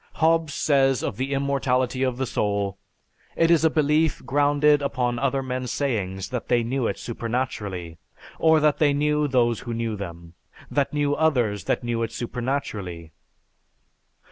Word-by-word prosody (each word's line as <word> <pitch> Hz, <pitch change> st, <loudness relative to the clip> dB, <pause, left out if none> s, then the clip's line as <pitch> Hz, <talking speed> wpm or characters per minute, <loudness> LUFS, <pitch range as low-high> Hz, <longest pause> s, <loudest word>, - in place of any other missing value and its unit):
Hobbes 165 Hz, -1 st, +2 dB
says 135 Hz, -3 st, +2 dB
of 100 Hz, -, -3 dB
the 135 Hz, +2 st, -2 dB
immortality 135 Hz, -2 st, 0 dB
of 130 Hz, -2 st, 0 dB
the 130 Hz, -, -1 dB
soul, 100 Hz, -4 st, -1 dB, 0.6 s
"It 165 Hz, 0 st, +3 dB
is 165 Hz, -2 st, +4 dB
a 160 Hz, -, +5 dB
belief 155 Hz, +1 st, +1 dB
grounded 145 Hz, +1 st, +3 dB
upon 125 Hz, -3 st, -1 dB
other 135 Hz, 0 st, 0 dB
men's 130 Hz, -1 st, -3 dB
sayings 100 Hz, -10 st, -2 dB
that 125 Hz, -2 st, -4 dB
they 120 Hz, -1 st, +2 dB
knew 125 Hz, +1 st, -1 dB
it -, -, -2 dB
supernaturally; 110 Hz, -8 st, -4 dB, 0.4 s
or 160 Hz, -1 st, +5 dB
that 150 Hz, -1 st, +2 dB
they 145 Hz, -2 st, +4 dB
knew 150 Hz, +1 st, +1 dB
those 120 Hz, -4 st, +2 dB
who 120 Hz, -2 st, -5 dB
knew 115 Hz, -1 st, -2 dB
them, 85 Hz, -4 st, -8 dB, 0.4 s
that 140 Hz, -1 st, +1 dB
knew 145 Hz, -1 st, +1 dB
others 125 Hz, -10 st, +1 dB
that -, -, 0 dB
knew 120 Hz, -1 st, -1 dB
it 115 Hz, -1 st, -2 dB
supernaturally." 110 Hz, -, -4 dB
130 Hz, 155 wpm, -24 LUFS, 115-145 Hz, 0.6 s, a